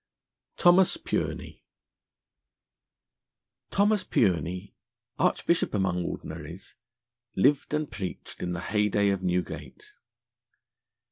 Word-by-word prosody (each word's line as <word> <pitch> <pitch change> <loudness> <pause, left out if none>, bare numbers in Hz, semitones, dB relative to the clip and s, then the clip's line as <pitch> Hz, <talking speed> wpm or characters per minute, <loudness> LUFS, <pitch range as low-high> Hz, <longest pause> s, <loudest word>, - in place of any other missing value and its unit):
THOMAS 175 +1 +5
PURENEY - - -3 2.1
THOMAS 205 +1 +2
PURENEY, 90 0 0 0.5
Archbishop 170 -6 +1
among 95 -3 0
Ordinaries, 90 +2 -7 0.6
lived 135 +8 +3
and 150 -1 -2
preached 100 -5 -6
in 90 - -2
the 90 - -4
heyday 105 0 +2
of 100 -1 0
Newgate. 90 - -3
100 Hz, 80 wpm, -27 LUFS, -, 2.1 s, THOMAS